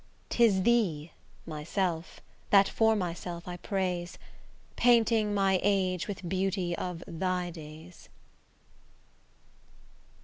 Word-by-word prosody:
'Tis 210 -6 +3
thee, 180 -10 +1 0.3
myself, 165 +2 -3 0.3
that 195 -1 +6
for 220 0 +2
myself 175 -2 -4
I 180 0 -5
praise, 180 -3 -3 0.6
Painting 230 -3 +3
my 195 -2 +2
age 185 -3 +1
with 195 -3 -6
beauty 185 -1 -1
of 180 -1 -5
thy 180 +1 -2
days. 160 +1 -12
185 Hz, 95 wpm, -29 LUFS, 175-200 Hz, 0.6 s, that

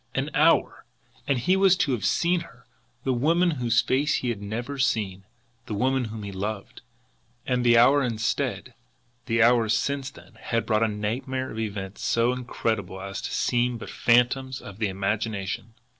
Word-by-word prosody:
An - - -1
HOUR - - +3 0.4
and 140 - +2
he 180 +10 +2
was 190 -1 +4
to 140 - +1
have 105 -6 0
seen 175 +7 +2
her, 125 -6 -13 0.4
the 130 - +1
woman 165 +8 +2
whose 120 -6 +1
face 145 +3 +1
he 125 - -1
had 110 -4 -3
never 120 +7 -5
seen, 100 -7 -1 0.4
the 105 - -3
woman 130 +3 +1
whom 110 -1 -7
he 100 - -6
loved! 100 +2 -5 0.6
And 125 -1 0
the 120 -1 +5
hour 135 +5 +6
instead, 115 -3 -2 0.5
the 115 -1 +3
hours 115 -2 +4
since 140 +4 -2
then, - - -17
had 115 -1 -1
brought 110 -1 +1
a 115 - +3
nightmare 120 +5 -3
of 110 - -6
events 100 -3 -5
so 115 +2 +2
incredible 110 -6 -3
as 95 0 -6
to - - -5
seem 120 0 0
but - - -8
phantoms 130 +2 +2
of 100 +1 -11
the 110 - +1
imagination. 100 +2 -3
115 Hz, 175 wpm, -25 LUFS, 105-130 Hz, 0.6 s, hour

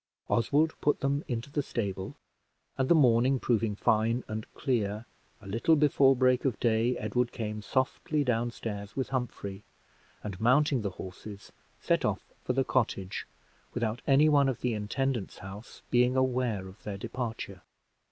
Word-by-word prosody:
Oswald 145 +7 +2
put 145 - +2
them 140 +1 0
into 120 +2 -4
the 145 - 0
stable; 100 -8 -4 0.6
and 130 0 0
the 170 - +7
morning 130 -2 +4
proving 115 -4 +1
fine 115 +4 +2
and 110 0 -5
clear, 110 -4 -1 0.3
a - - -16
little 115 +11 +2
before 140 -2 +4
break 130 0 +3
of 130 -5 0
day, 115 +1 +2
Edward 120 +3 0
came 105 -1 -4
softly 130 +6 0
down 120 -2 +1
stairs 105 -3 -6
with 130 - -2
Humphrey, 110 -6 -4 0.6
and, 100 -1 -6
mounting 130 +2 +4
the 100 - -1
horses, 95 +2 -9 0.3
set - - +1
off - - -1 0.2
for 125 - 0
the 135 +1 +2
cottage, 100 -7 -1 0.5
without 120 0 -1
any 140 +3 +6
one 140 -2 +4
in 130 - -2
the 125 -2 0
intendant's 115 +2 -2
house 100 +4 -10
being 125 +1 +4
aware 125 -7 0
of 95 +3 -14
their 100 -2 -5
departure. 115 -4 -5
120 Hz, 155 wpm, -29 LUFS, 105-130 Hz, 0.6 s, the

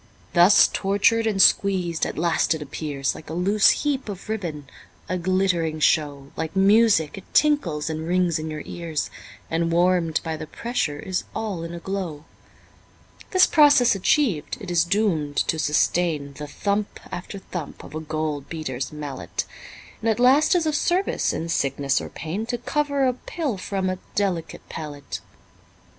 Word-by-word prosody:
Thus 175 +3 +7
tortured 205 +3 +2
and 205 -3 0
squeezed, 185 -4 +3
at - - -6
last 165 0 +2
it 155 - -7
appears 140 -1 -3
Like 155 - -11
a 160 - -4
loose 195 +4 +4 0.2
heap 275 -5 -1
of 195 +1 -8
ribbon, 165 -10 -4 0.4
a 185 - -2
glittering 175 -3 0
show, 145 -3 +1
Like 160 +2 -4
music 195 -4 +4
it - - -20
tinkles 195 - +2
and 160 0 -3
rings 175 -2 +1
in 155 0 -4
your 155 -1 -5
ears, 165 -4 -4 0.4
And 165 +1 0
warm'd 175 -2 +2
by 160 -1 -3
the 155 - -7
pressure 160 -8 -2
is 185 +5 -3
all 205 -6 -3
in 170 +1 -6
a - - -6
glow. 170 -5 -4 1.0
This 370 -1 +6
process 290 -5 +5
achiev'd, 195 - +1
it 195 -5 -6
is 170 -1 +4
doom'd 170 -7 0
to 160 - 0
sustain 150 -1 +1
The 150 +1 -7
thump 200 +7 -2
after 180 +3 -6
thump 180 -5 -7
of - - -12
a 155 - -3
gold 155 -2 -3
beater's 135 -6 -4
mallet, 150 -2 -5 0.6
And 225 - +1
at 220 - +1
last 275 +8 +5
is 340 -2 +2
of 310 - +1
service 360 +5 +1
in 165 - -3
sickness 140 -3 0
or - - -7
pain 185 +9 -5
To 245 0 -2
cover 285 +2 0
a 255 - +2
pill 280 0 -4
from 190 0 -3
a 185 0 -2 0.2
delicate 180 -6 -2
palate. 145 -3 -6
175 Hz, 165 wpm, -24 LUFS, 155-210 Hz, 1.0 s, Thus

